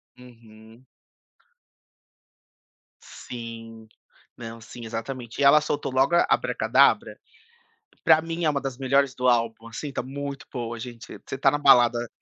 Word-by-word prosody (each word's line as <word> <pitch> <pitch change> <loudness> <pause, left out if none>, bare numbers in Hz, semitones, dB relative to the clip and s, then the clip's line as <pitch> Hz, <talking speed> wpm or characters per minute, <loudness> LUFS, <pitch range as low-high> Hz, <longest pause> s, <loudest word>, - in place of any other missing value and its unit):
Uhum. 115 -1 -17 2.2
Sim, 115 -2 -10 0.5
não, 115 -1 -9
sim, 115 +1 -10
exatamente 115 +1 -6
e - - +3
ela 140 +2 +7
soltou 145 -2 -3
logo 135 +6 +2
a 170 - +4
Abracadabra. - - +2 0.8
Para 160 -1 +5
mim 165 +1 -4
é 155 - +3
uma 140 -1 -1
das 135 -2 -5
melhores 135 0 +1
do 125 0 0
álbum. 115 -2 +1
Assim 115 +6 -6
está 140 - -4
muito 140 +1 -7
boa, 120 -2 -5
gente, 120 0 -9
você 135 - -6
tá 135 +1 +4
na 145 - -1
balada 120 -4 +4
125 Hz, 140 wpm, -25 LUFS, 115-140 Hz, 2.2 s, ela